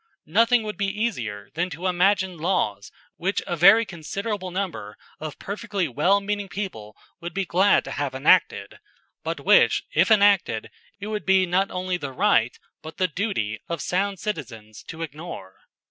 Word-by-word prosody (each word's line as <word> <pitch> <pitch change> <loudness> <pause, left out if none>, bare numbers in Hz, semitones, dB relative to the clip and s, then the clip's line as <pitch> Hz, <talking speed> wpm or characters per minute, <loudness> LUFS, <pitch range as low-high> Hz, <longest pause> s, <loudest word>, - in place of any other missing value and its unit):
Nothing 230 +7 +3
would 210 -1 -5
be 200 -1 0
easier 120 - -3
than 175 +3 -1
to 180 +1 -7
imagine 185 +1 +2
laws 105 - -1 0.3
which 190 +3 -1
a 175 - -2
very 220 +8 +6
considerable 190 +2 -5
number 180 - -5 0.2
of 155 -1 -6
perfectly 200 -3 -3
wellmeaning 200 - 0
people 110 - -6 0.2
would 170 +2 -7
be 195 -1 -1
glad 190 +4 +3
to - - -8
have - - -3
enacted, - - +2 0.4
but - - -3
which - - +5
if - - +3
enacted 200 - +3 0.3
it 200 - -6
would 210 -2 -3
be 190 +2 +4
not 185 +2 +1
only 185 0 -2
the 140 -5 -6
right, 120 -1 +2 0.2
but 160 +1 -10
the 185 - +2
duty, 165 - -3
of 170 -1 -3
sound 195 +4 -1
citizens 115 - -6
to 165 0 -6
ignore. 150 - -8
185 Hz, 160 wpm, -24 LUFS, 150-200 Hz, 0.4 s, very